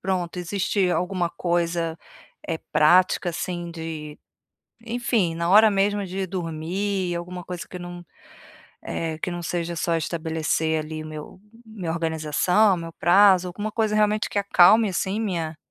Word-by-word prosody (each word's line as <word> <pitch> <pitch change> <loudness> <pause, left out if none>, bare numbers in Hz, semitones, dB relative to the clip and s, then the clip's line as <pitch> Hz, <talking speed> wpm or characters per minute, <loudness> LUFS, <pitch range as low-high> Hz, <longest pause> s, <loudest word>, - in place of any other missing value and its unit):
pronto, 180 -2 -2
existe 190 +1 0
alguma 175 0 -1
coisa, 170 -2 -1 0.5
eh, 165 -2 -2
prática 175 +4 +4
assim 175 0 -4
de, 160 -2 -7 0.7
enfim, 225 -7 0
na 170 +1 -1
hora 215 +3 +7
mesmo 200 0 +1
de 190 +1 -3
dormir, 180 +2 -3
alguma 180 +1 -6
coisa 180 0 -7
que - - -11
eu - - -11
não 175 0 -8 0.8
eh, 160 -1 -4
que 180 - -3
não 175 0 -5
seja 170 0 -3
só 165 +1 0
estabelecer 160 -1 -1
ali 155 0 -6
meu 155 +3 -9 0.2
minha 210 -7 -6
organização, 165 +5 +2
meu 165 -1 -7
prazo, 185 +1 +5
alguma 205 +4 -4
coisa 220 -2 0
realmente 215 0 +2
que - - -1
acalme 200 +2 +5
assim 190 +3 -2
minha 170 -7 -2
175 Hz, 145 wpm, -24 LUFS, 165-195 Hz, 0.8 s, hora